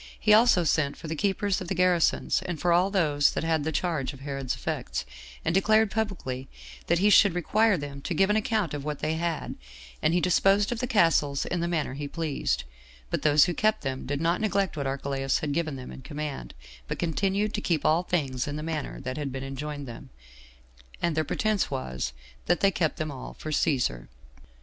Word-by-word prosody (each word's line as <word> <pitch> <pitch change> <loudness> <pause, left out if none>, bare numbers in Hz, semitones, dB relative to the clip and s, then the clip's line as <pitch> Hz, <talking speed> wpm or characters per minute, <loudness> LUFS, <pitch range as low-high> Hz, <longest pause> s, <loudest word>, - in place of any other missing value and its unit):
He 215 - +4
also 215 -4 +6
sent 145 -2 +1
for 165 - -8
the 160 - -3
keepers 200 +3 0
of 185 - -5
the 190 - -2
garrisons, 180 0 +2
and 175 -4 -3
for 175 +2 +2
all 180 +3 +4
those 150 -7 +3
that - - -2
had 160 -2 +1
the 160 - -1
charge 150 -5 -1
of 135 - -13
Herod's 135 -2 -3
effects, - - -3 0.4
and 165 - +1
declared 215 +2 +4
publicly 175 -13 -3 0.4
that 170 - +3
he 205 +4 +4
should 200 -3 +6
require 210 +4 +3
them 140 -2 -6
to 170 - -3
give 195 +4 +3
an - - +2
account 215 -5 0
of 145 -1 -4
what 150 0 -3
they 155 +3 -1
had; 165 0 -2 0.5
and 165 - +2
he - - +4
disposed 195 +4 +3
of 240 - -2
the 250 - -1
castles 165 - +2
in 175 - -2
the 170 - -1
manner 160 -6 -1
he 145 +1 -5
pleased; 155 -1 -2 0.5
but - - -1
those 150 -1 +5
who 175 - -1
kept 215 +1 +1
them 135 -2 -4
did 145 +1 -2
not 170 +4 +1
neglect 200 -5 0
what 140 -3 -2
Archelaus 135 0 -1
had 150 - -3
given 155 -1 -1
them 130 -1 -8
in - - -9
command, 145 - -6 0.3
but - - -3
continued 195 +5 0
to 210 - -2
keep 165 -7 0
all 160 +3 +4
things 140 -9 -1
in 145 - -3
the 150 - -4
manner 160 -2 -4
that 130 0 -4
had 145 -2 -3
been 130 0 -5
enjoined 140 +1 -5
them; 120 +3 -9 0.9
and 170 -2 0
their 155 - +2
pretense 215 +6 0
was, 65 -1 -3 0.4
that 175 0 +2
they 195 - +5
kept 160 -5 0
them 155 -1 -3
all 135 - -8
for 155 - -6
Cæsar. 125 - 0
160 Hz, 210 wpm, -27 LUFS, 140-190 Hz, 0.9 s, also